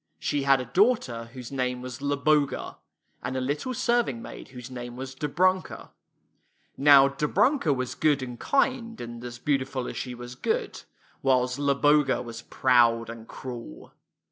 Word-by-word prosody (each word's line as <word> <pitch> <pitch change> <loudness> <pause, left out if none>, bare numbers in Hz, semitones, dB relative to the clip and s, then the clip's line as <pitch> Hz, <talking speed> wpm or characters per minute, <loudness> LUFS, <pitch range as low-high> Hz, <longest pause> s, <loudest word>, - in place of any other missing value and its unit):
She 145 - -1
had 135 -1 +4
a 125 - -4
daughter 130 - +1
whose 125 -2 -8
name 125 -2 -2
was 125 -1 -6
Zloboga, 145 +1 0 0.4
and 130 - -3
a - - 0
little 145 - -2
serving 235 - +1
maid - - -9
whose 125 -1 -10
name 120 -1 -7
was 130 +1 -6
Dobrunka. 180 +7 0 0.8
Now 140 -1 +7
Dobrunka 160 - +1
was 130 -2 -1
good 145 -3 +2
and 125 -2 -7
kind, 255 -4 0
and 120 0 -7
as 120 -1 -7
beautiful 130 -1 -1
as - - -6
she 125 -1 -5
was 120 0 -8
good; 125 - -2 0.4
while 130 -2 +3
Zloboga 140 +1 +2
was 115 -1 -8
proud 120 -2 +3
and 115 -1 -11
cruel. 120 - -9
130 Hz, 150 wpm, -26 LUFS, 125-145 Hz, 0.8 s, Now